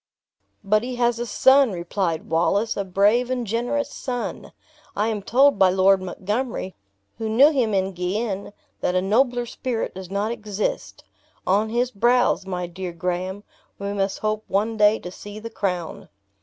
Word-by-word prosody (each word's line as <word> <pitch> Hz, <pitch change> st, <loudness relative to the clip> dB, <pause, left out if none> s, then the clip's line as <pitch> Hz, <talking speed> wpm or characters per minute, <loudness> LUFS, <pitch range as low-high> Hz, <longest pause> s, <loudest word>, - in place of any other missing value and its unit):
"But 210 Hz, +2 st, +3 dB
he 250 Hz, +1 st, -4 dB
has 240 Hz, -1 st, +1 dB
a 240 Hz, -, -3 dB
son," 265 Hz, +3 st, +5 dB
replied 175 Hz, -1 st, -2 dB
Wallace; 200 Hz, +7 st, +1 dB
"a 200 Hz, -, -1 dB
brave 205 Hz, +6 st, +2 dB
and 250 Hz, -2 st, -1 dB
generous 245 Hz, +7 st, -1 dB
son! 245 Hz, -2 st, -5 dB, 0.4 s
I 210 Hz, +2 st, +1 dB
am 215 Hz, -2 st, -2 dB
told 265 Hz, +4 st, +4 dB
by 190 Hz, -, +6 dB
Lord 190 Hz, +1 st, +4 dB
Montgomery, 205 Hz, +2 st, -3 dB, 0.5 s
who 220 Hz, -1 st, -2 dB
knew 270 Hz, +8 st, +6 dB
him 240 Hz, -8 st, +1 dB
in 190 Hz, 0 st, +1 dB
Guienne, 195 Hz, +3 st, -3 dB, 0.3 s
that 180 Hz, -, -1 dB
a 185 Hz, -, +3 dB
nobler 245 Hz, +4 st, +2 dB
spirit 240 Hz, 0 st, -3 dB
does 185 Hz, -1 st, -8 dB
not 200 Hz, +3 st, -1 dB
exist. 210 Hz, -3 st, -4 dB, 0.4 s
On 205 Hz, +4 st, +2 dB
his 240 Hz, +2 st, 0 dB
brows, 240 Hz, -2 st, +2 dB
my 180 Hz, -1 st, -3 dB
dear 175 Hz, +1 st, -6 dB
Graham, 180 Hz, +3 st, -3 dB, 0.3 s
we 200 Hz, 0 st, -4 dB
must 195 Hz, -1 st, -1 dB
hope 215 Hz, 0 st, -2 dB
one 215 Hz, +3 st, 0 dB
day 210 Hz, 0 st, +4 dB
to 180 Hz, -, -8 dB
see 205 Hz, +2 st, -10 dB
the 230 Hz, +1 st, -7 dB
crown." 180 Hz, -4 st, -3 dB
210 Hz, 165 wpm, -23 LUFS, 190-235 Hz, 0.5 s, by